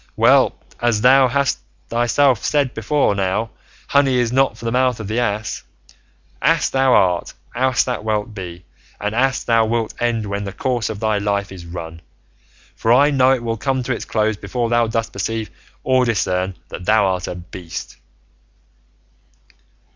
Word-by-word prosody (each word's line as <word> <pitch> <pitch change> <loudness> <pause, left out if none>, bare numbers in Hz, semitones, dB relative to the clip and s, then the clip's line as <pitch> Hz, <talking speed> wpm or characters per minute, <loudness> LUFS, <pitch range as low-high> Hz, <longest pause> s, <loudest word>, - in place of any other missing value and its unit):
Well, - - +4 0.3
as 120 -3 +1
thou 130 +2 +6 0.6
thyself 120 +2 +2
hast - - -2
said 140 -4 +1
before 125 +2 +1
now, 100 +3 -1 0.4
honey 140 -2 +3
is 120 -2 +1
not 135 +1 +2
for - - -10
the 115 - -1
mouth 125 -1 +1
of 110 - -6
the 110 +3 -1
ass. 110 -2 -2 0.8
Ass - - +2
thou 135 -1 +3
art, 90 -2 +2 0.2
ass 130 0 +2
thou 125 -3 -3
wilt 110 0 -2
be, 90 -3 -8 0.3
and 105 +1 -2
ass 130 +3 +1
thou 115 -1 +3
wilt 115 0 -1
end 115 -2 0
when 100 0 -3
the 100 -1 -6
course 120 +1 -1
of 110 -2 -5
thy 110 -2 0
life 100 -1 -1
is 90 -3 -10
run; 85 -1 -8 0.7
for 115 - 0
I 140 +5 +5
know 130 -2 +4
it 130 -3 0
will 115 -1 -2
come 130 +1 -1
to 130 - -1
its 115 - -5
close 110 -1 0
before 120 +2 -3
thou 120 0 +2
dost 115 0 -2
perceive 115 -1 -3 0.3
or 130 -1 +3
discern 95 -5 0
that 90 - -8
thou 105 0 +4
art 90 -1 -1
a - - -4
beast." 90 -1 -8
115 Hz, 170 wpm, -19 LUFS, 100-125 Hz, 0.8 s, thou